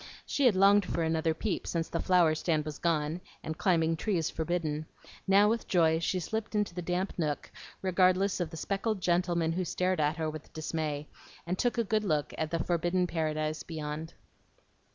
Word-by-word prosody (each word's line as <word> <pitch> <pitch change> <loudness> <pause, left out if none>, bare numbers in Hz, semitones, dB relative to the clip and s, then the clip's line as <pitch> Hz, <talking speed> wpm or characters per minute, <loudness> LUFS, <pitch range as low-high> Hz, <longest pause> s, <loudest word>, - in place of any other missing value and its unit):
She 280 -3 +2
had 220 - +4
longed 200 +2 +6
for 170 -2 -2
another 160 0 +1
peep 200 +2 -2
since 165 -1 -1
the 165 - -3
flower 175 -4 +4
stand 155 -1 0
was 150 -2 -6
gone, 165 0 0 0.2
and 160 - -4
climbing 165 -3 +2
trees 170 -3 0
forbidden; 160 -2 -2 0.4
now 200 +2 +6
with 230 +1 0
joy 160 -4 +3
she 185 +2 0
slipped 220 +5 -4
into 210 -4 0
the 180 - -4
damp 180 +3 -1
nook, 150 -3 -2 0.3
regardless 185 +1 +3
of 175 -3 -1
the 165 - -8
speckled 200 +4 -1
gentlemen 175 -2 +1
who 180 +3 -1
stared 180 +1 0
at 150 +1 +1
her 160 -1 -1
with 155 -1 -7
dismay, 155 -2 -3 0.4
and 180 +2 -2
took 245 0 +1
a 235 - +3
good 215 0 0
look 155 -7 0
at 160 -1 -2
the 165 - 0
forbidden 175 +1 +1
paradise 155 -2 -1
beyond. 155 0 -5
170 Hz, 185 wpm, -30 LUFS, 155-185 Hz, 0.4 s, longed